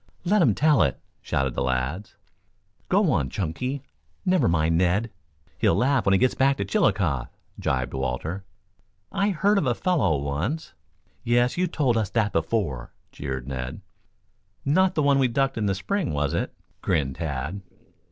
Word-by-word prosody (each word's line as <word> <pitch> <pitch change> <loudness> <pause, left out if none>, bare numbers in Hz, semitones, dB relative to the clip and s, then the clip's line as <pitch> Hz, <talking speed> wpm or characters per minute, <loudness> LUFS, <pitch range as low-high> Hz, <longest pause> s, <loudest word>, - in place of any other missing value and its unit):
"Let 205 +3 +3
him 115 - +4
tell 150 -2 +4
it," 70 - +1 0.2
shouted 65 -2 -1
the - - -2
lads. 65 +10 -2 0.7
"Go 190 -3 +3
on, 70 - +1
Chunky. 125 - -3 0.4
Never 180 -8 +3
mind 80 -1 +2
Ned. 95 +6 +1 0.5
He'll - - +3
laugh 135 -1 +2
when 95 - +5
he - - +6
gets 130 +5 +3
back 135 +1 +2
to 100 - -2
Chillicothe," 95 - +1 0.3
jibed 65 -1 -1
Walter. 65 +8 -3 0.7
"I 200 +1 +1
heard 200 +3 +2
of 155 - -1
a 120 - +2
fellow 140 - +1
once 75 - -3 0.2
" - - -40
"Yes; 120 +1 +2
you 180 +1 +1
told 140 -8 +1
us 110 -4 0
that 105 -2 0
before," 80 - -1 0.2
jeered 65 -3 -5
Ned. 65 +5 -5 0.8
"Not 185 +6 +3
the 155 - +2
one 140 -1 +4
we 130 - +4
ducked 135 +3 0
in 105 - 0
the 95 - +1
spring, 185 - -1
was 75 +1 -1
it?" 85 - -1 0.3
grinned 65 -4 0
Tad. 80 +4 -3
100 Hz, 165 wpm, -25 LUFS, -, 0.8 s, he